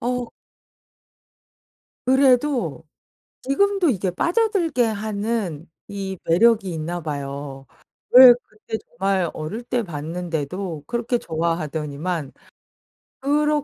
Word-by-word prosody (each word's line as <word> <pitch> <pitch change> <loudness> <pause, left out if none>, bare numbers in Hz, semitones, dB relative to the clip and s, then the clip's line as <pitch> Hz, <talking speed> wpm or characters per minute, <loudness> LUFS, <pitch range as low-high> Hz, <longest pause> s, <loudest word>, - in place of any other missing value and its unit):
어. 245 0 -2 1.8
그래도 255 - +2 0.6
지금도 390 +5 +2
이게 190 -5 0
빠져들게 340 - +1
하는 210 -6 -3 0.2
이 195 -2 -5
매력이 195 +2 +3
있나 170 +2 -4
봐요. 140 -2 -6 0.5
예. 255 -2 +12
그때 215 +1 -7
정말 195 -6 0
어릴 155 +10 -5
때 240 -1 -1
봤는데도 165 0 -4
그렇게 240 0 -1
좋아하더니만 160 - -3 0.9
그러 295 +1 +1
195 Hz, 200 characters per minute, -22 LUFS, 160-245 Hz, 1.8 s, 예